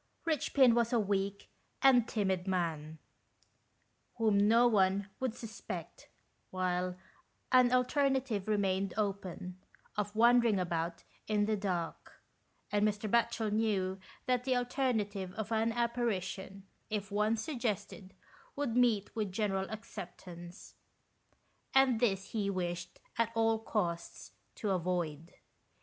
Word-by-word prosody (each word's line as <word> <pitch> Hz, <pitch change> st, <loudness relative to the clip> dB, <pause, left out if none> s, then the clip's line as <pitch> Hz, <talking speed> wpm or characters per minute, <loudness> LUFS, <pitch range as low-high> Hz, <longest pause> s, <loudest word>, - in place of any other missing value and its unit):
Richpin 280 Hz, -5 st, +4 dB
was 235 Hz, 0 st, +2 dB
a 240 Hz, -, +3 dB
weak 200 Hz, -1 st, -1 dB, 0.4 s
and 250 Hz, -4 st, +6 dB
timid 190 Hz, -4 st, -1 dB
man, 160 Hz, -4 st, -2 dB, 1.2 s
whom 220 Hz, -3 st, +2 dB
no 220 Hz, +4 st, +5 dB
one 195 Hz, -2 st, +2 dB
would 255 Hz, -3 st, -1 dB
suspect, 225 Hz, -2 st, -8 dB, 0.4 s
whilst 180 Hz, -1 st, -1 dB, 0.5 s
an 255 Hz, -2 st, +6 dB
alternative 255 Hz, -4 st, +1 dB
remained 195 Hz, -2 st, 0 dB
open, 190 Hz, -3 st, -3 dB, 0.4 s
of 210 Hz, 0 st, -2 dB
wandering 235 Hz, -1 st, +5 dB
about 170 Hz, -1 st, -2 dB, 0.2 s
in 210 Hz, -1 st, +2 dB
the 215 Hz, 0 st, +1 dB
dark; 185 Hz, -5 st, -3 dB, 0.6 s
and 205 Hz, 0 st, +2 dB
Mr. 210 Hz, 0 st, 0 dB
Batchel 230 Hz, -1 st, +1 dB
knew 200 Hz, -3 st, 0 dB, 0.3 s
that 250 Hz, -2 st, +1 dB
the 260 Hz, 0 st, +1 dB
alternative 220 Hz, -7 st, -1 dB
of 220 Hz, +2 st, -5 dB
an 225 Hz, +1 st, +2 dB
apparition, 200 Hz, -5 st, -2 dB, 0.2 s
if 205 Hz, -1 st, -3 dB
once 215 Hz, +2 st, +1 dB
suggested, 220 Hz, -, -4 dB, 0.4 s
would 280 Hz, -5 st, -1 dB
meet 235 Hz, -5 st, +2 dB
with 210 Hz, -4 st, -1 dB
general 195 Hz, -1 st, -1 dB
acceptance, 180 Hz, -4 st, -9 dB, 1.0 s
and 265 Hz, -4 st, +5 dB
this 195 Hz, -5 st, 0 dB
he 205 Hz, -3 st, -1 dB
wished, 175 Hz, -2 st, -3 dB, 0.2 s
at 230 Hz, -1 st, +2 dB
all 225 Hz, 0 st, +3 dB
costs, 175 Hz, -6 st, -3 dB, 0.2 s
to 210 Hz, -, -2 dB
avoid. 170 Hz, -3 st, -2 dB
210 Hz, 115 wpm, -33 LUFS, 185-230 Hz, 1.2 s, and